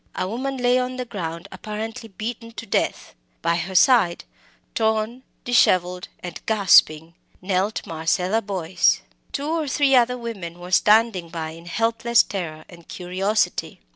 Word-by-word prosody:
A 185 - -2
woman 260 +6 -3
lay 250 0 +3
on 255 0 -2
the 250 0 -4
ground, 170 -7 -6
apparently 220 +2 -6
beaten 230 +3 -6
to 230 - -7
death. 195 - -1 0.3
By 170 0 +2
her 180 +3 -4
side, 195 -4 +4 0.5
torn, 220 +2 0 0.2
dishevelled, 180 -6 +2 0.2
and 175 -2 -7
gasping, 165 -6 +4 0.3
knelt 190 +3 -1
Marcella 180 +6 0
Boyce. 185 -4 +1 0.3
Two 285 +1 -3
or 320 -2 -1
three 275 0 +2
other 250 0 +3
women 200 -8 -6
were 180 +1 -9
standing 210 -3 +3
by 160 -2 -5
in 165 +1 -12
helpless 230 +4 +2
terror 160 -5 -6
and 170 -2 -15
curiosity. 190 +4 -1
205 Hz, 140 wpm, -23 LUFS, 175-235 Hz, 0.5 s, side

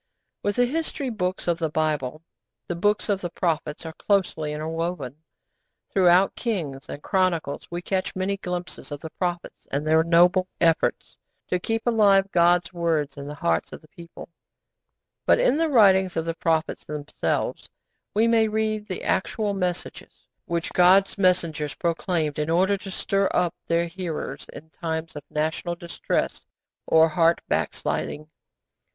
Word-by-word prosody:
With 205 0 -1
the 245 - +4
History 280 -1 -2
Books 185 -5 -3
of 170 -1 +1
the 160 -2 0
Bible, 155 -1 -1 0.4
the 175 - -2
Books 205 +4 +1
of 200 -2 0
the 175 - -3
Prophets 160 -3 -2
are 160 - -6
closely 180 -6 0
interwoven. 155 -2 -4 0.7
Throughout 185 0 +5
Kings 160 - -3
and 145 - -7
Chronicles 180 -7 0
we 175 0 -5
catch 190 0 -2
many 190 +1 -1
glimpses 180 -5 -6
of 145 - -5
the 160 +2 -8
prophets 175 -1 -4
and 140 - 0
of - - -8
their 160 +1 +4
noble 175 +2 +4
efforts 165 -1 +1 0.3
to 180 - +1
keep 225 +4 -2
alive 200 -4 +4
God's 175 +1 +3
words 165 -4 0
in 140 -1 -7
the 150 - -6
hearts 85 - -1
of - - -8
the 155 - -19
people; 170 +1 -12 1.0
but - - +6
in - - +3
the 325 0 +1
writings 190 - +5
of 165 - 0
the 165 - -1
prophets 165 -1 -1
themselves 150 -1 -3 0.5
we 220 +2 +4
may 225 -1 +4
read 215 -1 -1
the 185 - -5
actual 205 +2 0
messages 180 -3 -4 0.2
which 170 -4 -3
God's 190 +2 +5
messengers 165 -6 +1
proclaimed 165 -3 -1
in 150 +1 -1
order 185 +4 +3
to 195 0 -8
stir 195 +1 0
up 175 -2 +2
their 170 0 +2
hearers 165 -5 -5
in 160 +1 -12
times 160 -1 -4
of 145 - -5
national 160 +3 -2
distress 170 0 -2 0.5
or 160 0 +6
heart 165 +1 +3
backsliding. 155 +1 -2
175 Hz, 155 wpm, -25 LUFS, 160-195 Hz, 1.0 s, but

